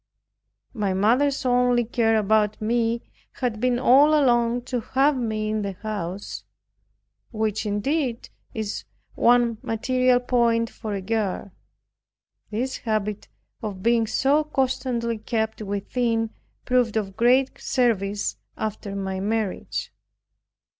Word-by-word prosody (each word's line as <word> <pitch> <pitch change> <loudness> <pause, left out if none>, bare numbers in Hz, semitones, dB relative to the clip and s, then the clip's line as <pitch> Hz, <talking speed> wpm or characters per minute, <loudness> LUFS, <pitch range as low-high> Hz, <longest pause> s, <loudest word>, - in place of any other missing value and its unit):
My 205 -5 -1
mother's 260 +8 +2
only 245 -1 +3
care 225 -1 +2
about 215 0 +2
me 230 +1 0 0.3
had 240 -5 -2
been 250 +1 +2
all 280 +5 +5
along 240 -2 +2
to 250 0 -2
have 270 +5 +2
me 215 -3 -2
in 215 0 -1
the 200 -1 -3
house, 200 -1 -5 0.9
which 215 -2 -1
indeed 240 +4 -1 0.2
is 215 -2 -4 0.3
one 235 -2 +3
material 255 +2 +2
point 235 -2 +1
for 215 -3 -5
a 195 - -3
girl. 200 -2 -2 1.0
This 250 +5 -2
habit 210 -2 -2 0.3
of 200 -4 -5
being 230 -1 +3
so 280 +7 +2
constantly 255 -5 -1
kept 220 0 -2
within, 225 +3 -1 0.3
proved 245 -3 +2
of 195 -3 -3
great 255 +4 +3
service 210 -6 0 0.2
after 210 -2 -4
my 190 -1 -3
marriage. 210 0 -2
230 Hz, 115 wpm, -24 LUFS, 210-250 Hz, 1.0 s, all